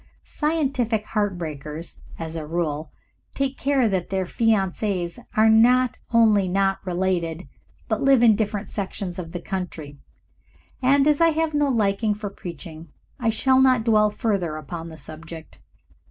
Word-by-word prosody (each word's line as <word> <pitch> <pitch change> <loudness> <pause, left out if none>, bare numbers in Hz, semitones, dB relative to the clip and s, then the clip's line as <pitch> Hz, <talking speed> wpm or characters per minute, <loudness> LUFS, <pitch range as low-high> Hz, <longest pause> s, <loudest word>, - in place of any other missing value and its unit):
Scientific 270 -8 -1
heart 205 -4 -1
breakers, 155 0 -7 0.2
as 165 0 -6
a 155 -2 -5
rule, 160 -2 -2 0.4
take 275 0 -1
care 270 -3 +2
that 190 -4 -1
their 190 -1 -1
fiancees 195 -3 0 0.2
are 220 +1 +6
not 240 +3 +4
only 215 -4 +4
not 195 +1 +1
related, 180 -2 -2 0.4
but - - -1
live 270 -3 +5
in 225 -3 +6
different 210 -1 -2
sections 190 -2 -5
of 165 -2 -6
the 175 - -5
country, 165 -6 -6 0.8
and 275 +2 +4
as 300 +1 +3
I 330 - +6
have 320 0 0
no 290 -1 +2
liking 210 -2 +1
for 205 -1 -6
preaching 170 -3 -9 0.3
I 235 -3 +1
shall 260 +4 +3
not 255 -3 +4
dwell 215 -2 +4
further 200 -7 -1
upon 165 +3 -7
the 160 - -11
subject." 160 +2 -10
200 Hz, 150 wpm, -23 LUFS, 170-235 Hz, 0.8 s, are